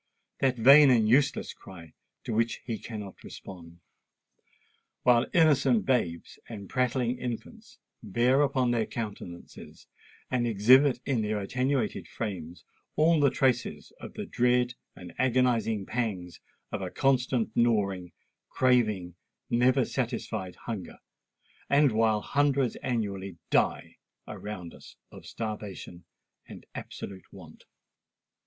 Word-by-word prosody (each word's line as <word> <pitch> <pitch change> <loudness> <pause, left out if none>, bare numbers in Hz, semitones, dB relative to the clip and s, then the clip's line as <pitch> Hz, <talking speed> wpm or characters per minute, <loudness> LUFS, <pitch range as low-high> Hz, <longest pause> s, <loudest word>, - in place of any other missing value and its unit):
"—that 130 -2 +1
vain 140 +5 +8
and 115 -4 +4
useless 135 +5 +2
cry 85 -4 -13 0.3
to 115 - -4
which 115 +1 +1
he 115 -3 -4
cannot 105 -4 -8
respond; 85 -2 -11 1.2
while 120 -1 +4
innocent 160 - +3
babes 90 -11 -1
and 100 -4 -9
prattling 125 -1 0
infants 225 - -7 0.2
bear 120 +7 +2
upon 130 -3 +1
their 115 -2 0
countenances 100 -6 -8 0.5
and 120 -2 +1
exhibit 125 +5 +5
in 130 -5 0
their 105 0 -1
attenuated 130 +6 -1
frames 90 -6 -6 0.3
all 160 +1 +4
the 140 -1 +5
traces 125 -2 -1
of - - -9
the - - -5
dread 125 0 +1 0.2
and 90 -2 -11
agonising 120 -5 +1
pangs 100 -8 -3 0.3
of - - -3
a - - -3
constant 125 -4 0
gnawing—craving—never 110 - 0
satisfied 90 -1 -3
hunger; 110 -6 -6 0.7
and 140 -1 +4
while 110 -1 +2
hundreds 140 -2 +1
annually 100 -7 -3
die - - +1 0.3
around 95 -5 -7
us - - -14 0.2
of - - -12
starvation 105 -5 -7 0.4
and - - -11
absolute 95 -3 -9
want? - - -14
115 Hz, 110 wpm, -28 LUFS, 100-130 Hz, 1.2 s, vain